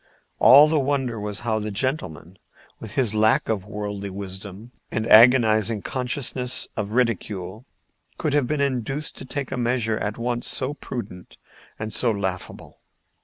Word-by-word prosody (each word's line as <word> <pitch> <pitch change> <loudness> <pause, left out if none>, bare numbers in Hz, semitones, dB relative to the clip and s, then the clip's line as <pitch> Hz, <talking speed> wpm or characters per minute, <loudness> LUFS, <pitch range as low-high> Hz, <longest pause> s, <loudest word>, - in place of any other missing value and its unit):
All 145 +3 +8
the 155 0 +1
wonder 135 -4 -1
was 105 -1 -2
how 110 -2 -1
the 105 0 -4
gentleman, 100 - -3 0.4
with 110 -2 -8
his 125 -6 +1
lack 110 0 +2
of 100 -4 -2
worldly 105 -1 -5
wisdom 100 +3 -8 0.2
and 110 - -2
agonizing 110 -2 +5
consciousness 125 0 -1
of 105 -2 -3
ridicule, 110 -2 -2 0.5
could 155 -3 -1
have 145 -4 +2
been 150 +1 -1
induced 135 +2 -2
to - - -7
take 130 +1 -5
a 130 - -3
measure 120 -2 0
at 105 +1 -3
once 120 0 -2
so 130 +2 0
prudent 115 -10 -8 0.4
and 110 0 -5
so 125 - +3
laughable. 95 -4 -5
115 Hz, 150 wpm, -23 LUFS, 105-130 Hz, 0.5 s, All